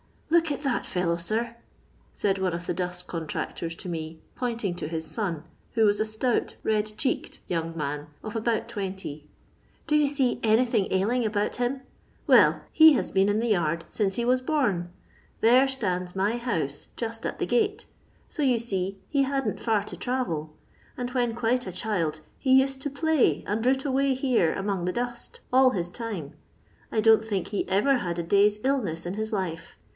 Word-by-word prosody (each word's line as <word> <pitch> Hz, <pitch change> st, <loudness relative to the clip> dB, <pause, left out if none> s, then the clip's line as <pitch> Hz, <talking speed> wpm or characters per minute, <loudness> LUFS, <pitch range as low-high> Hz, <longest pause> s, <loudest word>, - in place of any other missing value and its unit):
"Look 335 Hz, -1 st, +4 dB
at 285 Hz, -, -3 dB
that 275 Hz, -4 st, -1 dB
fellow, 170 Hz, -2 st, 0 dB
sir 215 Hz, +7 st, -1 dB
1" 235 Hz, 0 st, -11 dB, 0.6 s
said 195 Hz, -1 st, +1 dB
one 185 Hz, -2 st, 0 dB
of 170 Hz, +1 st, -4 dB
the -, -, -1 dB
dust 180 Hz, -1 st, -3 dB
contracton 165 Hz, 0 st, -4 dB
to 185 Hz, -, -6 dB
me, 160 Hz, -1 st, -5 dB
pointing 230 Hz, -6 st, -2 dB
to 175 Hz, -, -4 dB
his 160 Hz, 0 st, -3 dB
son, 175 Hz, -9 st, -2 dB, 0.3 s
who 225 Hz, -1 st, +4 dB
was 205 Hz, 0 st, +3 dB
a 215 Hz, -, +2 dB
stout 220 Hz, +3 st, -1 dB
red 215 Hz, -1 st, +1 dB
cheeked 265 Hz, -, -2 dB
young 165 Hz, -1 st, -2 dB
man 150 Hz, 0 st, -3 dB, 0.2 s
of 215 Hz, 0 st, -6 dB
about 225 Hz, 0 st, 0 dB
twenty. 190 Hz, -9 st, -6 dB, 0.3 s
" -, -, -36 dB
Do 300 Hz, -, +2 dB
you 300 Hz, -1 st, +4 dB
see 275 Hz, -3 st, +1 dB
anything 225 Hz, -2 st, +3 dB
ailing 220 Hz, +7 st, +1 dB
about 210 Hz, -1 st, -1 dB
him? 250 Hz, +2 st, -1 dB, 0.4 s
Well, -, -, +5 dB
he 315 Hz, -1 st, +8 dB
has 260 Hz, -, -1 dB
been 195 Hz, 0 st, +3 dB
in 205 Hz, -, +2 dB
the 230 Hz, +1 st, 0 dB
yard 170 Hz, -4 st, +1 dB
since 195 Hz, -3 st, 0 dB
he 235 Hz, -, -1 dB
was 255 Hz, +1 st, +3 dB
bom. 240 Hz, -, 0 dB, 0.5 s
There 250 Hz, +4 st, +6 dB
stands 185 Hz, -9 st, -2 dB
my 205 Hz, +5 st, +1 dB
house 160 Hz, -, -2 dB
just 230 Hz, -1 st, -4 dB
at -, -, -3 dB
the -, -, -1 dB
gate, 425 Hz, -1 st, +1 dB, 0.4 s
so 305 Hz, -, -5 dB
you 260 Hz, -4 st, +3 dB
see 195 Hz, -4 st, -2 dB
he 280 Hz, -2 st, +2 dB
hadn't 270 Hz, -5 st, -1 dB
far 220 Hz, -3 st, +1 dB
to -, -, -7 dB
travel, 165 Hz, -13 st, -2 dB, 0.4 s
and 245 Hz, 0 st, -3 dB
when 240 Hz, -3 st, 0 dB
quite 240 Hz, 0 st, 0 dB
a -, -, -3 dB
child 175 Hz, -6 st, -1 dB, 0.2 s
he 265 Hz, -1 st, +5 dB
used 270 Hz, 0 st, -2 dB
to 290 Hz, -, -2 dB
play 280 Hz, -, +2 dB
and 215 Hz, +2 st, -1 dB
root 265 Hz, +2 st, +2 dB
away 270 Hz, 0 st, +2 dB
here 250 Hz, -, +2 dB
among 195 Hz, -3 st, -2 dB
the 180 Hz, -, -1 dB
dust 240 Hz, 0 st, -4 dB
all 260 Hz, 0 st, +7 dB
bis 175 Hz, -5 st, -3 dB
time. 205 Hz, -, -5 dB, 0.6 s
I 220 Hz, -, +1 dB
don't 220 Hz, 0 st, +6 dB
think 200 Hz, -5 st, -2 dB
he 205 Hz, -, -2 dB
ever 230 Hz, +8 st, +3 dB
had 175 Hz, -4 st, -3 dB
a 170 Hz, -, -1 dB
day's 205 Hz, +4 st, +4 dB
illness 210 Hz, -12 st, 0 dB
in 175 Hz, -, -3 dB
his 220 Hz, +2 st, -3 dB
life. 175 Hz, -5 st, -3 dB
215 Hz, 190 wpm, -26 LUFS, 180-250 Hz, 0.6 s, he